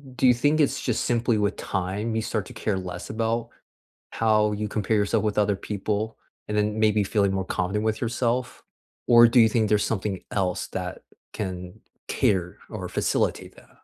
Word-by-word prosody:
do 130 - +3
you 125 - +7
think 145 +6 +2
it's 145 - +2
just 120 -4 -1
simply 120 -1 +1
with 105 0 0
time 100 +4 -3
you 110 - +1
start 110 -2 -2
to - - -10
care 100 -3 -1
less 90 -1 -6
about 115 +1 -1 0.6
how 105 -1 +2
you 105 +1 -2
compare 105 +1 -1
yourself 100 +1 +1
with 105 -1 -1
other 105 -1 +3
people 105 +2 -3 0.3
and 105 - -2
then 105 +1 0
maybe 105 -1 +3
feeling 100 -1 +1
more 95 -1 -1
confident 95 +4 -1
with 110 -1 -1
yourself? 120 +1 -1 0.4
Or 120 -1 +8
do 120 +2 +4
you 115 -1 +7
think 110 -1 +1
there's 105 0 +3
something 100 -3 -2
else 95 -3 -1
that - - -5 0.3
can 90 -4 -5 0.3
cater 90 -3 0
or - - -5
facilitate - - -1
that? - - -18
105 Hz, 180 wpm, -25 LUFS, 100-115 Hz, 0.6 s, Or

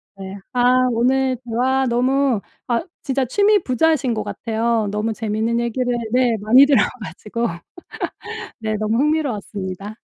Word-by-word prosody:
네. 195 0 -8 0.2
아 250 +1 +3
오늘 255 +2 +1
대화 260 +3 +1
너무 255 0 +2 0.3
아 235 -1 +1 0.2
진짜 270 -1 0
취미 410 - +3
부자이신 265 -1 +1
것 215 - -2
같아요. 225 -1 -1
너무 210 +2 -1
재밌는 220 +2 -1
얘기를 245 +1 -1 0.2
네 250 -1 +3
많이 245 +7 +7
들어 280 -2 +4 0.2
가지고 210 +7 -4 1.1
네 215 -1 -2
너무 215 +2 0
흥미로웠습니다. 215 - -2
235 Hz, 280 characters per minute, -20 LUFS, 220-260 Hz, 1.1 s, 많이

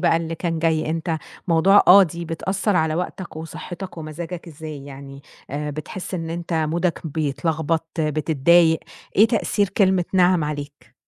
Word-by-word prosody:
بقى 170 -2 +3
اللي 165 0 -3
كان 165 0 -2
جاي، 160 -1 +1
أنت 165 0 -2 0.3
موضوع 185 +5 +5
آه، 195 +2 +10
دي 170 -1 -3
بتأثّر 190 +4 -1
على 160 -1 +1
وقتك 180 0 -5
وصحّتك 175 +3 -7
ومزاجك، 165 +3 -7
إزاي؟ 150 -2 -8
يعني 140 0 -10 0.3
آآ 150 +2 -3
بتحس 155 +6 -6
إن 165 -2 -4
أنت 170 +1 -5
مودك 165 +2 -1
بيتلخبط، 160 +1 -1
بتتضايق، 160 +2 +3 0.4
إيه 215 - +7
تأثير 215 -3 0
كلمة 190 -2 +2
نعم 180 -3 +4
عليك؟ 145 -1 -7
165 Hz, 145 wpm, -22 LUFS, 155-180 Hz, 0.4 s, آه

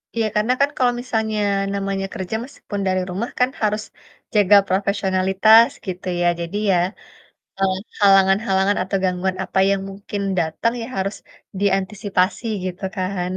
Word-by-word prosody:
Iya, 225 -1 +1
karena 220 +4 +2
kan 280 - +4
kalau 245 -1 +3
misalnya 220 -3 -2 0.4
namanya 195 -1 -2
kerja 190 0 -4
meskipun 205 -6 -7
dari 185 0 +1
rumah 200 +7 -3
kan, 250 - +4
harus 210 0 +1 0.5
jaga 205 -1 +5
profesionalitas, 195 +3 +4 0.2
gitu 185 -1 -6
ya. 175 - +3
Jadi 170 +3 -5 0.2
ya, 180 - +3 0.8
eee, 190 -1 +1 0.2
halangan-halangan 195 0 +4
atau 190 +2 -2
gangguan 185 0 0
apa - - -3
yang 200 -1 +1
mungkin 200 +1 -6 0.2
datang, 170 +7 0
ya - - -5
harus 195 +2 -2 0.4
diantisipasi 195 +1 0 0.2
gitu 185 +1 -5
kan. 185 -1 -2
195 Hz, 140 wpm, -21 LUFS, 185-210 Hz, 0.8 s, jaga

